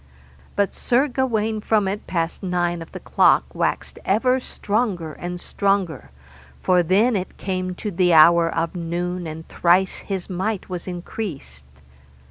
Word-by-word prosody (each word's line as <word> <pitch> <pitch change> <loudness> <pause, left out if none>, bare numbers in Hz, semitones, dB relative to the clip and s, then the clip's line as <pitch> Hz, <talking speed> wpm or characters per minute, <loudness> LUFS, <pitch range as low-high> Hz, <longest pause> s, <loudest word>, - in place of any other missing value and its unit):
But 200 -1 +1
Sir 255 +4 +2
Gawaine 225 -5 -1
from 210 -2 +2
it 200 +2 -4
passed 165 -2 -2
nine 175 -2 -1
of 165 - -10
the - - -7
clock - - +3
waxed - - -2
ever 250 +6 +2
stronger 205 -9 -2
and 175 +2 -6
stronger, 190 - -1 0.5
for 180 -1 +3
then 205 +8 +3
it 185 -2 -4
came 185 -1 -3
to 210 +3 -4
the 180 0 +2
hour 165 +1 +7
of 165 0 -2
noon, 175 +1 -3
and 160 +1 -8
thrice 180 +2 +2
his 190 -3 -4
might 190 +2 -2
was 180 -1 -5
increased. 170 - -6
185 Hz, 145 wpm, -22 LUFS, 170-205 Hz, 0.5 s, hour